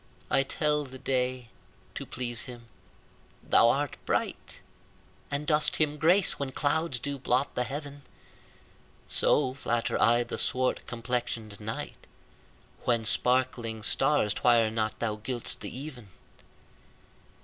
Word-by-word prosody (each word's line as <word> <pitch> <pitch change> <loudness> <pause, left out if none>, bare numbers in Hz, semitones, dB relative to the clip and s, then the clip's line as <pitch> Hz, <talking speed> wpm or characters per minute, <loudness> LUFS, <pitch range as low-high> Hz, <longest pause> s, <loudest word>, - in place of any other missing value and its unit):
I - - +4
tell 150 +2 +1
the 130 -1 -10
day, 130 -2 -2 0.4
to - - -6
please 120 -1 -2
him 120 -2 -10 0.8
thou 115 - +5
art 145 +2 -1
bright, - - -2 0.7
And 140 +1 -2
dost 150 0 +3
him 150 -1 +1
grace 175 +5 +3
when 135 -2 -3
clouds 150 0 +1
do 140 +3 -4
blot 130 +2 0
the 125 - 0
heaven: 145 +1 -6 1.1
So 130 -3 +3
flatter 120 -4 -1
I 120 +1 +4
the 120 - -5
swart 130 0 0
complexion'd 115 -3 -3
night, 110 +1 -6 0.8
When 115 -2 +1
sparkling 120 -2 +1
stars 135 -4 +3
twire 115 -2 +3
not 110 -1 -2
thou 110 -2 -2
gild'st 120 +2 -4
the - - -5
even. 130 -6 -8
125 Hz, 125 wpm, -28 LUFS, 115-145 Hz, 1.1 s, thou